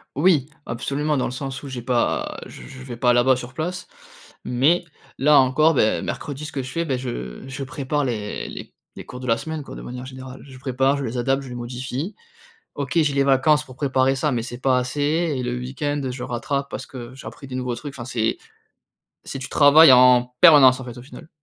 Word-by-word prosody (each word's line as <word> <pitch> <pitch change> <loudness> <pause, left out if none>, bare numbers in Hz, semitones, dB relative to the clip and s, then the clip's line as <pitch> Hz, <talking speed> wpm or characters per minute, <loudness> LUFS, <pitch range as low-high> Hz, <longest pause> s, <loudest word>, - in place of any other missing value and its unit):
Oui, 150 -2 +3 0.2
absolument 140 +5 -2
dans 130 - 0
le - - -3
sens 135 0 -5
où 140 - -9
j'ai 130 -2 -6
pas 120 0 -1
je - - -12
je 130 -1 -11
vais 125 -2 -7
pas 120 +1 +2
là-bas 120 +2 +4
sur 125 0 -8
place. 175 +5 -4 0.6
Mais, 155 +8 +2 0.3
là 145 +2 +5
encore, 145 +5 +4
ben, 110 -6 +1
mercredi 145 +1 -5
ce - - -7
que 135 -2 -3
je 130 - -7
fais, 165 +2 -2
beh 130 -4 -1
je 65 - -6
je 135 +1 -6
prépare 145 0 -2
les 105 -4 -4
les - - -9 0.2
les - - -9
cours 125 - -9
de 130 - -7
la 115 - +3
semaine, 160 +6 -5
quoi, - - -10
de - - -8
manière 125 +1 -7
générale. 130 0 -10
Je 130 - -12
prépare, 135 +1 +1
je 140 - -3
les 120 +1 -4
adapte, 135 +3 0
je 130 - -9
les 125 - -7
modifie. 130 - -5 0.6
OK, 140 +1 -4
j'ai 145 -2 +1
les 140 - +3
vacances 140 +2 +3
pour 130 -2 -14
préparer 135 -1 +1
ça, 150 +1 0
mais 120 -2 -1
c'est 120 0 -7
pas 130 -1 +2
assez 130 +3 -3 0.4
et 125 - -3
le 125 0 -2
week-end, 140 +4 -3
je 125 0 -6
rattrape 140 +3 -3
parce - - -6
que 125 -1 -9
j'ai 135 - -9
appris 135 - -11
des 130 - -8
nouveaux 125 -1 -3
trucs, 145 +1 -8
enfin 120 - -7
c'est 115 -2 -1 0.8
c'est 135 - -7
tu 130 - -7
travailles 145 0 +7
en 125 0 +5
permanence, 135 -5 +8
en - - -7
fait, 120 -1 -9
au 120 - -9
final. 145 +3 -13
130 Hz, 225 wpm, -22 LUFS, 125-140 Hz, 0.8 s, permanence